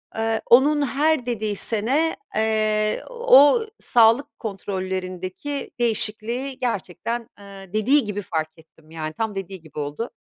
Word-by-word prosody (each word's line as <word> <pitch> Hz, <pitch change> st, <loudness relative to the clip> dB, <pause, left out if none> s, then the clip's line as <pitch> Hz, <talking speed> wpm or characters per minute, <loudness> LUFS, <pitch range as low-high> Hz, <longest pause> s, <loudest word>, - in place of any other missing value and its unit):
Eee, 225 Hz, 0 st, 0 dB
onun 290 Hz, +5 st, +5 dB
her 295 Hz, -1 st, +1 dB
dediği 220 Hz, -4 st, -2 dB
sene, 250 Hz, +11 st, 0 dB, 0.2 s
eee, 215 Hz, -1 st, +1 dB
o 470 Hz, -, +5 dB
sağlık 230 Hz, +3 st, +3 dB
kontrollerindeki 190 Hz, +4 st, -4 dB
değişikliği 235 Hz, +3 st, -2 dB
gerçekten, 230 Hz, +1 st, -3 dB
ııı, 195 Hz, -2 st, -12 dB
dediği 255 Hz, +7 st, +3 dB
gibi 205 Hz, -1 st, -4 dB
fark 160 Hz, -4 st, -2 dB
ettim, 160 Hz, -1 st, -21 dB
yani 155 Hz, -1 st, -5 dB
tam 220 Hz, +4 st, -3 dB
dediği 195 Hz, -1 st, -6 dB
gibi 155 Hz, -2 st, -10 dB
oldu. 150 Hz, +11 st, -4 dB
220 Hz, 125 wpm, -23 LUFS, 190-250 Hz, 0.2 s, onun